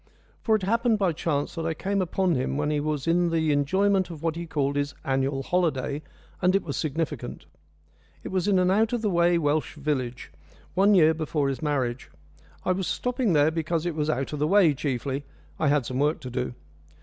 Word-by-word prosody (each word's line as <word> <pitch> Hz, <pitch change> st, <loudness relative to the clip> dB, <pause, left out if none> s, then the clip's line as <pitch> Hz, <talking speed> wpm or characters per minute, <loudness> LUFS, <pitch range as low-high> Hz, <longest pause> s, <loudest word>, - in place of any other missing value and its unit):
For 220 Hz, -, +3 dB
it 210 Hz, -, -1 dB
happened 230 Hz, +3 st, +2 dB
by 190 Hz, -5 st, +1 dB
chance 150 Hz, -2 st, -2 dB
that 165 Hz, -2 st, -4 dB
I 165 Hz, -, -1 dB
came 200 Hz, +4 st, -1 dB
upon 185 Hz, 0 st, +1 dB
him 130 Hz, 0 st, -1 dB
when 150 Hz, 0 st, 0 dB
he 150 Hz, -, +1 dB
was 150 Hz, -2 st, -2 dB
in 170 Hz, +1 st, +2 dB
the 160 Hz, -2 st, +1 dB
enjoyment 190 Hz, +7 st, +2 dB
of 165 Hz, -2 st, -9 dB
what 165 Hz, -1 st, 0 dB
he 170 Hz, 0 st, -5 dB
called 140 Hz, -3 st, -1 dB
his 145 Hz, 0 st, -1 dB
annual 135 Hz, 0 st, 0 dB
holiday, 150 Hz, -4 st, 0 dB, 0.4 s
and 180 Hz, +1 st, +3 dB
it 195 Hz, -, +2 dB
was 140 Hz, -, -4 dB
significant. 155 Hz, -3 st, -3 dB, 0.8 s
It -, -, -5 dB
was 185 Hz, 0 st, -1 dB
in 200 Hz, -2 st, +4 dB
an 180 Hz, 0 st, +3 dB
out 220 Hz, +4 st, +2 dB
of 235 Hz, -2 st, -1 dB
the 210 Hz, -, +1 dB
way 170 Hz, 0 st, +3 dB
Welsh 155 Hz, 0 st, 0 dB
village, 135 Hz, -5 st, -3 dB, 0.4 s
one 200 Hz, +3 st, +4 dB
year 160 Hz, -3 st, +6 dB
before 155 Hz, -3 st, -1 dB
his 135 Hz, -, -4 dB
marriage. 130 Hz, -, -1 dB, 0.6 s
I -, -, +2 dB
was 185 Hz, 0 st, -1 dB
stopping 245 Hz, +3 st, 0 dB
there 150 Hz, +1 st, +4 dB
because 165 Hz, 0 st, -1 dB
it 175 Hz, -, -1 dB
was 150 Hz, 0 st, -1 dB
out 135 Hz, -1 st, -1 dB
of 150 Hz, -, -3 dB
the 150 Hz, -, +2 dB
way 185 Hz, -4 st, +5 dB
chiefly 135 Hz, 0 st, -3 dB, 0.4 s
I 155 Hz, -, +2 dB
had 145 Hz, -3 st, +2 dB
some 130 Hz, +2 st, -3 dB
work 150 Hz, +3 st, +1 dB
to 130 Hz, -, -7 dB
do. 125 Hz, 0 st, -3 dB
160 Hz, 210 wpm, -26 LUFS, 145-180 Hz, 0.8 s, year